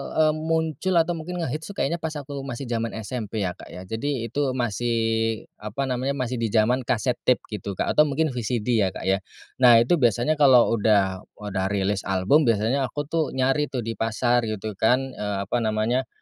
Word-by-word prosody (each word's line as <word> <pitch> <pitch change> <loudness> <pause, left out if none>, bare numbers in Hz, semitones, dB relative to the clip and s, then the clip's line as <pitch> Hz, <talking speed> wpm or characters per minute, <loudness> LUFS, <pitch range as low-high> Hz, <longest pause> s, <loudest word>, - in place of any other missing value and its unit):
eee, 155 -1 +4 0.2
muncul 160 +3 0
atau 165 0 +3
mungkin 175 +1 -4
ngehits 155 +2 -4
tuh 200 - -9
kayaknya 170 -1 -1
pas 160 -1 -4
aku 140 -1 -6
masih 125 0 -6
zaman 115 0 -2
SMP 110 -1 -4
ya 90 - -1
Kak - - -13
ya 90 - -9
jadi 115 +4 -3
itu 140 -3 0
masih 120 0 -1 0.7
apa 105 +6 -3
namanya 130 +2 -1
masih 125 -1 -2
di 115 - +1
zaman 115 +4 +2
cassette 125 0 0
tape 125 - +3
gitu 100 -1 -5
Kak - - 0
atau 150 0 +5
mungkin 155 +2 0
VCD 120 -2 -3
ya 95 -2 +2
Kak - - -6
ya. 95 +1 +2 0.4
Nah 125 -2 +8
itu 170 +8 +2
biasanya 120 +5 +2
kalau 130 -4 +6
udah 100 -4 +2 0.2
udah 100 -2 -3
rilis 100 0 0
album 95 +11 +3
biasanya 115 +5 +1
aku 145 +3 -4
tuh 160 -5 -1
nyari 135 +3 +1
tuh 125 -4 -4
di 115 - -3
pasar 120 +1 +1
gitu 110 0 -4
kan, 125 +4 +3
eee, 105 -3 -3
apa 110 - -1
namanya, 110 +4 0
125 Hz, 195 wpm, -24 LUFS, 110-140 Hz, 0.7 s, Nah